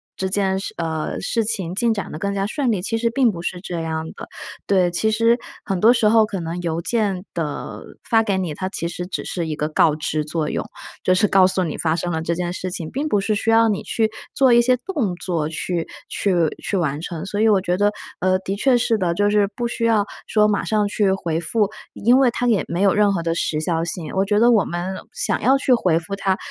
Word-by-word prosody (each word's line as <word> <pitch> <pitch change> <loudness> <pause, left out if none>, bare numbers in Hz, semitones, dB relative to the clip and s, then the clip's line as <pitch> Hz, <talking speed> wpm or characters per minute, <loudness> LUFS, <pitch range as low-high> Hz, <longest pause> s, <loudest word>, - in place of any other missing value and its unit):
这 190 - -2
件 190 0 0
事 195 - -6
呃， 160 -2 -3
事 230 - 0
情 200 -6 -2
进 230 +4 +1
展 200 - -5
得 - - -6
更 200 +2 -2
加 195 0 0
顺 250 +4 0
利， 200 -5 -1
其 225 +3 -1
实 230 0 +1
并 240 0 +3
不 170 -4 -7
是 180 +1 -4
这 175 -3 -4
样 160 -1 -3
的。 - - -10 0.4
对， 185 -3 +3
其 220 +5 +1
实 230 +2 +3 0.3
很 195 -2 -1
多 220 +5 +6
时 230 -3 +3
候 220 +1 +5
可 210 -3 -3
能 170 +1 -4
邮 165 -1 -2
件 205 -4 -1
的 155 -4 -4 0.3
发 225 -2 +4
给 205 -4 0
你， 180 -5 -2
它 185 +4 -4
其 170 -3 -3
实 175 +1 -5
只 - - -4
是 170 -3 -3
一 155 - -3
个 150 - -1
告 155 0 +3
知 155 0 -2
作 155 0 -2
用， - - -2 0.4
就 185 - +3
是 210 +3 +3
告 190 -1 +5
诉 185 0 0
你 160 -4 -3
发 160 -1 +1
生 175 +1 -2
了 160 - -1
这 170 +1 -1
件 175 0 -2
事 185 0 -4
情， 170 -3 -6
并 290 +4 -2
不 205 - +2
是 205 +2 0
需 210 +2 -1
要 225 0 +5
你 205 - -1
去 220 -1 0 0.2
做 260 -3 +5
一 240 - +7
些 250 +1 +3
动 275 - -1
作 170 -4 -2
去 165 +1 -3 0.2
去 195 -3 0 0.3
去 200 - -1
完 150 -4 -1
成。 165 -1 -5
所 205 +2 -2
以 220 - +5
我 205 -3 +4
觉 180 -1 -1
得， 205 +2 +2 0.3
呃， 185 +1 +2
的 195 +1 -3
确 255 +4 +3
是 230 -2 +1
的， 175 -3 0
就 205 +2 +2
是 205 -1 +3
不 240 - -1
需 235 0 -2
要 220 -3 +3 0.2
说 210 -1 +3
马 205 -1 0
上 210 -1 +1
去 200 -1 +1
回 170 -4 -1
复， 205 +5 0 0.2
因 245 +5 +3
为 265 -2 +5
它 245 +1 -2
也 225 -6 +2
没 175 +4 -1
有 195 - +4
任 205 -1 +3
何 175 -4 -1
的 165 0 0
时 160 -2 -1
效 165 +1 -1
性， 170 -1 -5
我 190 - +3
觉 205 +1 +1
得 240 +2 +5
我 215 -5 +4
们 175 +3 -4 0.2
想 - - -2
要 265 +4 +4
去 265 -1 +2
回 185 -9 +2
复 170 +4 -4
它， 195 -1 0
195 Hz, 270 characters per minute, -21 LUFS, 170-220 Hz, 0.4 s, 一